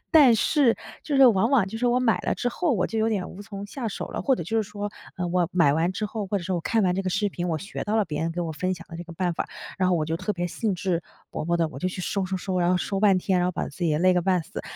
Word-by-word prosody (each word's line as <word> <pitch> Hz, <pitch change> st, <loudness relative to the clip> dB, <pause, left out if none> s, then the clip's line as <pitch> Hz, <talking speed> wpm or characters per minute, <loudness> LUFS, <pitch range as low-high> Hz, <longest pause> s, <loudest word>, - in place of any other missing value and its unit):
但 285 Hz, -8 st, +7 dB
是 260 Hz, +1 st, +3 dB, 0.3 s
就 295 Hz, -, -3 dB
是 270 Hz, -, +8 dB
往 225 Hz, 0 st, +4 dB
往 235 Hz, -9 st, +3 dB
就 220 Hz, -, -6 dB
是 245 Hz, +2 st, 0 dB
我 245 Hz, +1 st, +3 dB
买 235 Hz, -3 st, +3 dB
了 -, -, 0 dB
之 245 Hz, -, -1 dB
后， 320 Hz, +3 st, 0 dB
我 185 Hz, -5 st, +1 dB
就 225 Hz, -, -3 dB
有 220 Hz, -, +2 dB
点 195 Hz, -4 st, -1 dB
无 200 Hz, -, -9 dB
从 200 Hz, -1 st, -7 dB
下 240 Hz, +2 st, -5 dB
手 -, -, -5 dB
了。 -, -, -5 dB
或 270 Hz, -, +3 dB
者 170 Hz, -, -4 dB
就 225 Hz, +8 st, -2 dB
是 200 Hz, -, -10 dB
说， 205 Hz, 0 st, -4 dB, 0.3 s
呃， 180 Hz, -1 st, -2 dB
我 175 Hz, -1 st, +2 dB
买 145 Hz, -4 st, +5 dB
完 165 Hz, +3 st, +1 dB
之 210 Hz, +3 st, -2 dB
后 215 Hz, -1 st, -4 dB
或 200 Hz, +1 st, 0 dB
者 175 Hz, -, -8 dB
说 185 Hz, +1 st, -1 dB
我 -, -, -1 dB
看 225 Hz, +5 st, +1 dB
完 180 Hz, -, +2 dB
这 195 Hz, -, -1 dB
个 185 Hz, -, -2 dB
视 205 Hz, +2 st, +1 dB
频， 180 Hz, -1 st, -4 dB
我 160 Hz, -2 st, 0 dB
学 200 Hz, -, -6 dB
到 215 Hz, +2 st, 0 dB
了 215 Hz, -, +3 dB
别 150 Hz, -3 st, -4 dB
人 165 Hz, +1 st, 0 dB
给 175 Hz, -, -3 dB
我 165 Hz, -2 st, -2 dB
分 185 Hz, +4 st, -1 dB
享 170 Hz, -1 st, -12 dB
的 165 Hz, -, -8 dB
这 175 Hz, -, -6 dB
个 170 Hz, -, -10 dB
办 175 Hz, 0 st, -1 dB
法， -, -, -3 dB, 0.3 s
然 185 Hz, -1 st, +2 dB
后 175 Hz, -, +3 dB
我 155 Hz, -, 0 dB
就 160 Hz, +1 st, -2 dB
特 200 Hz, +4 st, -2 dB
别 175 Hz, -2 st, -2 dB
兴 210 Hz, +4 st, -1 dB
致 175 Hz, -1 st, -1 dB, 0.3 s
勃 -, -, -3 dB
勃 170 Hz, +1 st, +1 dB
地 165 Hz, -1 st, +2 dB
我 -, -, -9 dB
就 185 Hz, -, 0 dB
去 185 Hz, -, -6 dB
收 195 Hz, +1 st, -1 dB
收 190 Hz, 0 st, -2 dB
收， 185 Hz, 0 st, -2 dB
然 175 Hz, -, +3 dB
后 180 Hz, -, +3 dB
收 195 Hz, +2 st, -2 dB
半 195 Hz, -3 st, +5 dB
天， 185 Hz, 0 st, +1 dB
然 180 Hz, -, +2 dB
后 -, -, -2 dB
把 -, -, -2 dB
自 145 Hz, -, -14 dB
己 175 Hz, -, +1 dB
也 150 Hz, -1 st, +1 dB
累 185 Hz, +1 st, +4 dB
个 180 Hz, -, +2 dB
半 185 Hz, -1 st, +2 dB
死。 -, -, -7 dB
185 Hz, 365 characters per minute, -25 LUFS, 175-215 Hz, 0.3 s, 是